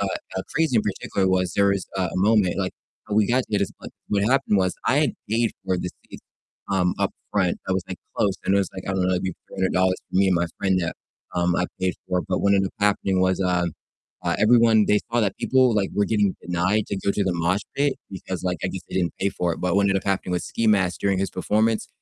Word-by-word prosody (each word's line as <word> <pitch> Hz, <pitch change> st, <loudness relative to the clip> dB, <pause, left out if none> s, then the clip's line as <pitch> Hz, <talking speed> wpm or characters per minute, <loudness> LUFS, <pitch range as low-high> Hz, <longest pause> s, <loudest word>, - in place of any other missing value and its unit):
uh 100 Hz, -, 0 dB, 0.3 s
uh, 95 Hz, -, -1 dB
crazy 160 Hz, -6 st, +2 dB
in 110 Hz, -, +4 dB
particular 95 Hz, -1 st, -1 dB
was 90 Hz, -2 st, +1 dB
there 100 Hz, -, +4 dB
was 100 Hz, -2 st, 0 dB
a 95 Hz, -, +1 dB
a 90 Hz, -, -4 dB
moment, 100 Hz, -2 st, +3 dB
like, 95 Hz, -1 st, -1 dB, 0.4 s
how 105 Hz, -, -2 dB
we 105 Hz, -1 st, +4 dB
got 125 Hz, +3 st, +2 dB
to 105 Hz, -, +2 dB
this 100 Hz, -, -1 dB
pla -, -, -9 dB, 0.2 s
What 100 Hz, -1 st, +1 dB
happened 130 Hz, -3 st, +2 dB
was 95 Hz, -1 st, +1 dB
I 130 Hz, -, +3 dB
had 150 Hz, -1 st, +2 dB, 0.2 s
paid 115 Hz, +2 st, +1 dB
for 95 Hz, -1 st, 0 dB
the 90 Hz, -, -3 dB, 0.2 s
seats, -, -, -11 dB, 0.5 s
um, 90 Hz, -2 st, +2 dB
up -, -, 0 dB, 0.2 s
front 95 Hz, -4 st, +1 dB
that 95 Hz, -, 0 dB
was, 95 Hz, -1 st, -1 dB
like, 95 Hz, -, -5 dB, 0.2 s
close, 100 Hz, -2 st, +2 dB
and 95 Hz, -, +2 dB
it -, -, +4 dB
was 100 Hz, -, 0 dB
like, 95 Hz, -, -6 dB
I -, -, 0 dB
don't 95 Hz, -, +1 dB
know, 90 Hz, -, +1 dB
maybe 90 Hz, 0 st, -2 dB
$300 95 Hz, -1 st, +1 dB
for -, -, -2 dB
me 95 Hz, +1 st, +4 dB
and 95 Hz, -, +3 dB
my 85 Hz, 0 st, +1 dB
friend 95 Hz, -1 st, +1 dB
that, 85 Hz, -2 st, -2 dB, 0.4 s
um, 90 Hz, 0 st, +1 dB
I 90 Hz, -, +1 dB
paid 95 Hz, 0 st, +1 dB, 0.2 s
for, 90 Hz, -1 st, +1 dB
but -, -, +1 dB
what 100 Hz, 0 st, +3 dB
ended 95 Hz, -1 st, +2 dB
up -, -, -20 dB
happening 100 Hz, -2 st, +2 dB
was, 95 Hz, +1 st, +2 dB
um, 90 Hz, -3 st, +1 dB, 0.5 s
uh, -, -, +1 dB
everyone 110 Hz, -1 st, +5 dB
they 105 Hz, -, +4 dB
saw 120 Hz, -, +3 dB
that 105 Hz, -3 st, 0 dB
people, 130 Hz, -3 st, +3 dB
like, 100 Hz, -2 st, +1 dB
were 105 Hz, -, +2 dB
getting 105 Hz, -3 st, +1 dB
denied 90 Hz, +5 st, 0 dB
to 100 Hz, -, -2 dB
go 95 Hz, -, 0 dB
to 100 Hz, -, 0 dB
the 95 Hz, -, +1 dB
mosh 85 Hz, +4 st, +1 dB, 0.2 s
pit, 140 Hz, -1 st, +2 dB, 0.2 s
because 95 Hz, -2 st, -6 dB
like 90 Hz, -2 st, -1 dB
I -, -, +1 dB
guess -, -, -5 dB
they -, -, -5 dB
didn't 90 Hz, -3 st, +1 dB
pay 100 Hz, -, +2 dB
for 90 Hz, -3 st, -1 dB
it. -, -, -6 dB
But 90 Hz, +1 st, +1 dB
what 100 Hz, -, +4 dB
ended 100 Hz, -1 st, +2 dB
up -, -, -11 dB
happening 95 Hz, -2 st, -1 dB
with 90 Hz, -, -1 dB
Ski 115 Hz, -, -2 dB
Mask 95 Hz, -4 st, +2 dB
during 100 Hz, -1 st, +1 dB
his 95 Hz, -1 st, -1 dB
performance, 110 Hz, +4 st, +1 dB
95 Hz, 260 wpm, -24 LUFS, 90-105 Hz, 0.5 s, everyone